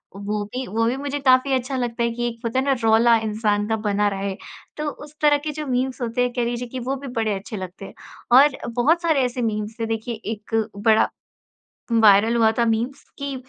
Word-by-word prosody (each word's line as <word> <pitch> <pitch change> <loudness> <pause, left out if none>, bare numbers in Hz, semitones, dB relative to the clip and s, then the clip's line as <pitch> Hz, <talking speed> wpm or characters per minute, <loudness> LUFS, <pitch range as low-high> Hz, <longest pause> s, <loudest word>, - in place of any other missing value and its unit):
वो 205 +1 -3
भी 255 +1 -3
वो 225 +3 0
भी 250 - 0
मुझे 285 +1 -3
काफ़ी 265 0 +4
अच्छा 260 +1 -1
लगता 235 -1 -2
है 235 - +1
कि 240 +1 -2
एक 230 -1 -6
होता 230 +3 0
है 265 - -1
ना, 275 - +3
रौला 225 +1 +5
इंसान 210 -1 0
का 225 - +2
बना 205 0 +2
रहे, 195 0 -3 0.4
तो 300 0 -2
उस 295 +1 -11
तरह 295 -1 +5
के 300 +1 -4
जो 305 +1 -5
मीम्स 255 +1 -1
होते 240 +1 -1
हैं, 245 - 0
कह 245 - -1
लीजिए 240 +1 -3
कि 255 +2 -6
वो 260 +3 -2
भी 275 +1 -8
बड़े 220 -2 0
अच्छे 210 +2 -8
लगते 185 +1 -8
हैं। - - -11 0.5
और 280 -1 +4 0.2
बहुत 305 +8 +2
सारे 320 -5 +2
ऐसे 250 0 -3
मीम्स 215 0 -3
थे, 225 - -1
देखिए, 225 +1 -3
एक 220 0 -6 0.2
बड़ा 220 +1 +3 0.8
वायरल 220 0 +5
हुआ 225 -1 +4
था 235 - +4
मीम्स 230 +4 -1
कि, 280 -1 -4
235 Hz, 225 wpm, -22 LUFS, 220-265 Hz, 0.8 s, रौला